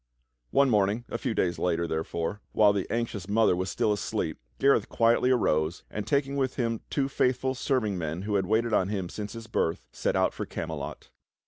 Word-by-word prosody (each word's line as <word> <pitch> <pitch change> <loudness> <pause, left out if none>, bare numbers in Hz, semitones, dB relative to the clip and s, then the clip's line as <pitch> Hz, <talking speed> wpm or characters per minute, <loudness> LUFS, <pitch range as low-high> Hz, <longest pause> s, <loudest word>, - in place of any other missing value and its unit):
One 140 -2 +4
morning 105 +2 +2
a 115 - -3
few 120 -5 -2
days 85 -2 0
later, 85 0 +1
therefore, 80 +4 -3
while 105 -1 +5
the 100 -2 -2
anxious 110 -5 -2
mother 110 -3 +4
was 95 +1 -2
still 105 - +1
asleep, 100 - -2 0.2
Gareth 140 0 +3
quietly 115 +2 +3
arose, 85 -9 +1
and 105 - -4
taking 140 -1 +1
with 130 -2 0
him 115 -3 -1
two 140 -2 0
faith 130 -2 +1
ful 130 0 0
serving 125 -8 0
men 80 +2 -3
who 105 +1 -2
had 95 -2 +1
waited 110 +2 +1
on 95 - +3
him 95 -4 -2
since 105 +2 -6
his 115 -1 -8
birth, 85 -6 -1
set - - -1
out - - +2
for - - -5
Camelot. - - -6
105 Hz, 200 wpm, -28 LUFS, 95-120 Hz, 0.2 s, while